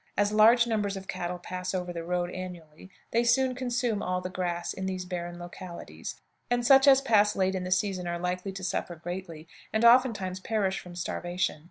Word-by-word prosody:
As 205 Hz, +1 st, +2 dB
large 225 Hz, +3 st, +6 dB
numbers 205 Hz, -4 st, -1 dB
of 190 Hz, 0 st, -9 dB
cattle 175 Hz, 0 st, -3 dB
pass 180 Hz, +1 st, -5 dB
over 180 Hz, -1 st, -3 dB
the 170 Hz, -1 st, -5 dB
road 175 Hz, +1 st, -1 dB
annually, 180 Hz, -2 st, -9 dB, 0.2 s
they 235 Hz, +1 st, +3 dB
soon 255 Hz, +2 st, +3 dB
consume 245 Hz, -4 st, -1 dB
all 180 Hz, 0 st, -1 dB
the 185 Hz, 0 st, -6 dB
grass 175 Hz, -2 st, -2 dB
in 190 Hz, 0 st, -4 dB
these 185 Hz, -1 st, -3 dB
barren 175 Hz, -1 st, -5 dB
localities, 175 Hz, 0 st, -8 dB, 0.3 s
and 245 Hz, 0 st, +1 dB
such 270 Hz, +2 st, +7 dB
as 270 Hz, -1 st, +7 dB
pass 210 Hz, -5 st, +3 dB
late 190 Hz, 0 st, +1 dB
in 185 Hz, -1 st, -3 dB
the 180 Hz, -, -4 dB
season 185 Hz, -1 st, 0 dB
are 175 Hz, 0 st, -2 dB
likely 180 Hz, +2 st, -3 dB
to 190 Hz, 0 st, -7 dB
suffer 180 Hz, -1 st, -2 dB
greatly, 170 Hz, -1 st, -7 dB, 0.2 s
and 220 Hz, +2 st, +2 dB
oftentimes 230 Hz, -7 st, +4 dB
perish 195 Hz, -2 st, -1 dB
from 180 Hz, -1 st, -11 dB
starvation. 175 Hz, -1 st, -2 dB
185 Hz, 195 wpm, -28 LUFS, 175-220 Hz, 0.3 s, such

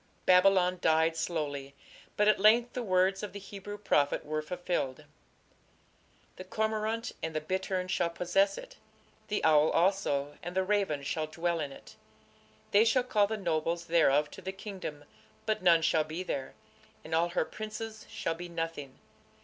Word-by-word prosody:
Babylon 185 Hz, -1 st, +5 dB
died 160 Hz, +1 st, +3 dB
slowly, 145 Hz, -5 st, -3 dB, 0.4 s
but 210 Hz, -, +3 dB
at 215 Hz, -, +4 dB
length 230 Hz, +4 st, +5 dB
the 250 Hz, -, -3 dB
words 190 Hz, -2 st, +2 dB
of 210 Hz, -2 st, -6 dB
the 200 Hz, -, -6 dB
Hebrew 200 Hz, +1 st, -8 dB
prophet 145 Hz, -10 st, +1 dB
were 155 Hz, +1 st, -2 dB
fulfilled: 175 Hz, -5 st, -3 dB, 1.3 s
The 185 Hz, -, -7 dB
cormorant 220 Hz, +3 st, -2 dB
and 160 Hz, -1 st, -4 dB
the -, -, +1 dB
bittern 185 Hz, +3 st, -2 dB
shall 180 Hz, -2 st, 0 dB
possess 185 Hz, +4 st, +1 dB
it; -, -, -10 dB, 0.5 s
the 210 Hz, -, -2 dB
owl 155 Hz, -1 st, +5 dB
also 165 Hz, -6 st, +1 dB
and 175 Hz, 0 st, -7 dB
the 190 Hz, -, +2 dB
raven 190 Hz, -8 st, 0 dB
shall 155 Hz, +2 st, -2 dB
dwell 170 Hz, +2 st, -1 dB
in 145 Hz, -3 st, -3 dB
it.... -, -, -14 dB, 0.7 s
They 205 Hz, +2 st, +6 dB
shall 240 Hz, +3 st, +3 dB
call 210 Hz, -5 st, +2 dB
the 220 Hz, +1 st, -3 dB
nobles 170 Hz, -2 st, -1 dB
thereof 150 Hz, -3 st, +3 dB
to -, -, -10 dB
the 190 Hz, +1 st, -4 dB
kingdom, 190 Hz, -7 st, -7 dB, 0.4 s
but 215 Hz, -, 0 dB
none 170 Hz, -3 st, +5 dB
shall 155 Hz, 0 st, +3 dB
be 160 Hz, +4 st, -5 dB
there, 135 Hz, -7 st, -4 dB, 0.5 s
and 160 Hz, -, -7 dB
all 170 Hz, +2 st, +2 dB
her 175 Hz, -, 0 dB
princes 215 Hz, 0 st, -7 dB
shall 165 Hz, -, -2 dB
be 175 Hz, +2 st, -8 dB
nothing. 165 Hz, -5 st, -5 dB
180 Hz, 165 wpm, -30 LUFS, 160-200 Hz, 1.3 s, They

